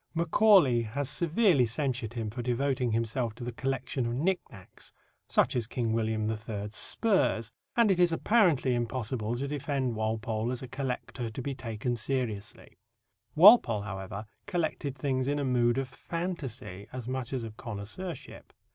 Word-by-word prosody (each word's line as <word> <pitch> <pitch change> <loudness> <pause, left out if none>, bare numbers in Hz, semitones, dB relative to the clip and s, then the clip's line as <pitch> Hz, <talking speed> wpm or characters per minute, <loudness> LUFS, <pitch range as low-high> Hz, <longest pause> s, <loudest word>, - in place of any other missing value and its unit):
Macaulay 170 - +5
has 125 +5 -3
severely 170 - +3
censured 120 -2 -1
him 115 -3 -3
for 120 +3 -5
devoting 125 0 0
himself 115 0 -1
to 120 - -8
the 120 - -3
collection 130 0 -2
of 120 - -2
knick 180 +8 +1
knacks, 90 - -11 0.4
such 135 - +3
as 120 -3 0
King 115 -2 -1
William 110 -1 0
III.'s 105 -1 -4
spurs, 130 - +2 0.3
and 230 -4 +5
it 180 - +1
is 175 -1 +5
apparently 165 - +3
impossible 120 -1 -2
to 135 +3 -3
defend 140 -3 -1
Walpole 110 +1 -1
as 130 0 -3
a - - -6
collector 125 -2 -4
to 110 +4 -6
be 140 - -2
taken 120 -1 -3
seriously. 120 -4 -3 0.6
Walpole, 160 - +7
however, 100 +1 -6 0.2
collected 160 -7 -2
things 130 -1 -1
in 145 +1 +1
a 145 - -1
mood 120 -1 +2
of 135 -1 -1
fantasy 130 - -5
as 125 -2 -6
much 130 -1 -3
as 130 -3 -2
of 110 -1 -7
connoisseurship. 115 - -7
125 Hz, 155 wpm, -29 LUFS, 115-140 Hz, 0.6 s, Walpole